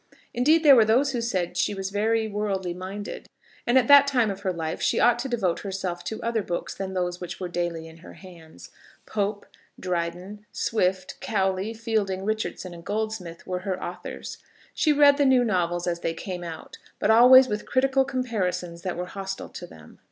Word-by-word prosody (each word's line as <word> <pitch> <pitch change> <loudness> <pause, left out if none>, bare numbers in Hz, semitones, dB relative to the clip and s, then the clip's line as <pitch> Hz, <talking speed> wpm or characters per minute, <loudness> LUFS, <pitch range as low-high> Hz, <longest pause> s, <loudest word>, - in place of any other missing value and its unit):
Indeed, 305 +7 +3
there 285 -3 +9
were 230 - +7
those 250 +6 +3
who 245 -3 -2
said 185 -7 -1
that 180 - -9
she 190 +3 0
was 195 0 -4
very 220 +2 +1
worldly 200 -4 -2
minded, 190 +3 -7 0.4
and 240 +2 +4
that 250 -2 +3
at 280 0 +8
her 265 -3 0
time 220 -4 +3
of 195 +1 -8
life 165 -4 -3
she - - +1
ought 240 0 +4
to 265 +2 -3
devote 195 -8 0
herself 185 -3 -4
to 220 - -4
other 230 -1 0
books 175 -3 -4
than 190 -1 -5
those 180 -1 -2
which 180 - -6
were 185 - -3
daily 175 -2 -3
in 160 0 -14
her 170 - -13
hands. 160 - -14 0.3
Pope, 205 0 -2 0.3
Dryden, 180 +3 -4
Swift, 185 -4 -1
Cowley, 195 +1 -1
Fielding, 215 -4 -1
Richardson, 215 -4 -3
and 170 -1 -11
Goldsmith, 210 -6 -4
were 180 0 -3
her 185 0 -3
authors. - - -7 0.3
She 310 - +2
read 285 -1 +6
the 290 - +3
new 260 -2 +5
novels 175 -5 0
as 170 -1 -1
they 165 -1 -2
came 180 0 -6
out, 165 -2 -9 0.2
but 220 - +2
always 255 +3 +8
with 210 -2 -4
critical 270 +1 +2
comparisons 190 -10 -3
that 180 -1 -4
were 180 - -3
hostile 195 +1 -6
to 175 - -9
them. 80 - -16
195 Hz, 195 wpm, -25 LUFS, 180-230 Hz, 0.4 s, there